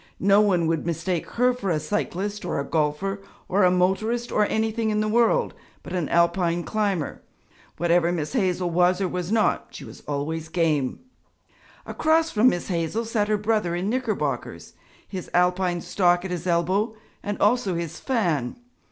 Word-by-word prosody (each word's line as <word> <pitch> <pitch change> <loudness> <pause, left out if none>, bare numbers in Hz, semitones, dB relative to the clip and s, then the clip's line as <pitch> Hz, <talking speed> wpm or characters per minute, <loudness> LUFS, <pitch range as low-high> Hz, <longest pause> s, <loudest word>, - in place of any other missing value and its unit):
No 200 +2 +5
one 185 -5 +2
would 160 -1 0
mistake 170 +1 -2
her 250 +1 +3
for 205 -6 -4
a 160 -3 +1
cyclist 205 +3 -3
or - - -2
a - - -1
golfer 160 +7 -1 0.3
or 195 +2 +2
a 180 - +6
motorist 205 +7 0
or 210 -1 +2
anything 220 0 0
in 210 0 0
the 215 - +1
world 240 - +2 0.3
but - - -8
an 175 -5 -1
Alpine 170 0 +2
climber; 200 -7 -2 0.6
whatever 175 0 +2
Miss 160 0 -3
Hazel 185 -6 0
was 180 +2 +3
or 195 - 0
was 180 +1 -4
not, 225 -1 +1
she - - -10
was - - -12
always 155 +3 -3
game. 155 -6 0 0.8
Across 320 +1 +1
from 230 +4 +5
Miss 175 -2 -3
Hazel 175 +6 -1
sat 220 -2 0
her 215 0 +2
brother 210 -5 0
in 185 +4 -1
knickerbockers, 245 -4 -3 0.3
his 185 -3 -7
Alpine 180 0 +2
stock 175 -1 +2
at 190 - -4
his 180 0 -4
elbow 185 +6 +1 0.3
and 205 0 -3
also 205 -3 +2
his 170 -1 -4
fan. 175 - 0
185 Hz, 170 wpm, -24 LUFS, 170-215 Hz, 0.8 s, a